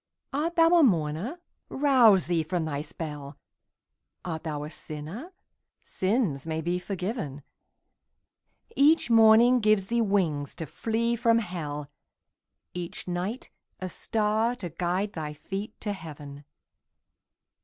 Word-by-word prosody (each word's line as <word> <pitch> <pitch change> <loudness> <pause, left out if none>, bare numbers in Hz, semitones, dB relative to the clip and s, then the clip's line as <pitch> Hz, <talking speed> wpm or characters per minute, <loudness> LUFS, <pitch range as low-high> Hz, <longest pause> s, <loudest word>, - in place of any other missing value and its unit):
Art 320 +5 -1
thou 330 -1 +6
a 345 - +7
mourner? 180 - +1 0.3
Rouse 250 - +5
thee 170 -1 +1
from 165 +1 -2
thy 145 -2 -2
spell; 150 -2 -7 0.9
Art 160 -3 -4
thou 150 -2 -3
a 150 - -7
sinner? 165 - -7 0.5
Sins 185 - 0
may 160 0 -2
be 175 +2 -1
forgiven; 180 - -4 1.3
Each 295 -3 +4
morning 225 +2 +7
gives 215 -3 +3
thee 235 - +3
wings 175 -9 0
to 165 - -5
flee 230 - -1
from 230 0 +3
hell, 150 -8 -4 0.8
Each 175 0 -6
night 180 +7 -4 0.3
a 185 - -4
star 220 +5 0
to 185 -7 -6
guide 180 +5 -1
thy 150 -2 -4
feet 195 +7 -6
to 205 - -2
heaven. 145 -5 -10
185 Hz, 120 wpm, -27 LUFS, 155-230 Hz, 1.3 s, a